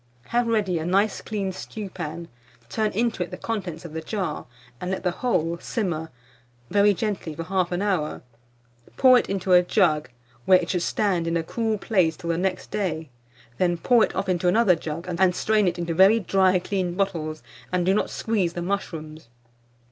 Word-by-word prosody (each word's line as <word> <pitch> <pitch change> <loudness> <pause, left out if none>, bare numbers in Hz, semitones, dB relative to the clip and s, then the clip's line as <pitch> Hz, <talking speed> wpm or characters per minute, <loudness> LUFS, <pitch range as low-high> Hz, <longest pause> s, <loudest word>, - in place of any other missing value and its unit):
Have 240 0 +1
ready 205 -7 +1
a - - -3
nice 200 +4 +2
clean 200 -3 -3
stewpan; 175 -4 -6 0.4
turn 215 -1 0
into 230 -1 0
it 175 - -2
the - - -7
contents 180 -7 -4
of 160 - -8
the 160 - -4
jar, 185 - -4 0.3
and 180 - -4
let 190 - -3
the 180 - +1
whole 170 -7 -1
simmer 170 -8 -3 0.6
very 205 0 +5
gently 200 -6 -3
for 165 - -4
1/2 180 +1 -1
hour; 180 -7 -1 0.7
pour 255 -2 +7
it - - -5
into 190 -1 0
a 180 - +8
jug, 170 - +2 0.4
where 185 - +7
it 180 -1 -2
should 180 - 0
stand 180 -3 0
in 165 0 +1
a 165 - -1
cool 220 +4 -1
place 185 -7 +1
till 170 - -3
the 165 - -1
next 185 0 -2
day; 160 -8 -2 0.5
then 175 -1 +2
pour 235 +6 +4
it - - -1
off - - -2
into 180 -1 +1
another 205 +1 +5
jug, 165 +1 -6
and 180 +1 +2
strain 215 -2 +2
it 180 - 0
into 170 -1 -2
very 195 +6 +6
dry 190 -2 +3
clean 180 -1 -2
bottles, 165 -6 -2 0.3
and 180 -1 +1
do 190 - +3
not 210 - 0
squeeze 200 -7 -1
the 175 - -4
mushrooms. 160 -7 -4
185 Hz, 185 wpm, -24 LUFS, 170-205 Hz, 0.7 s, a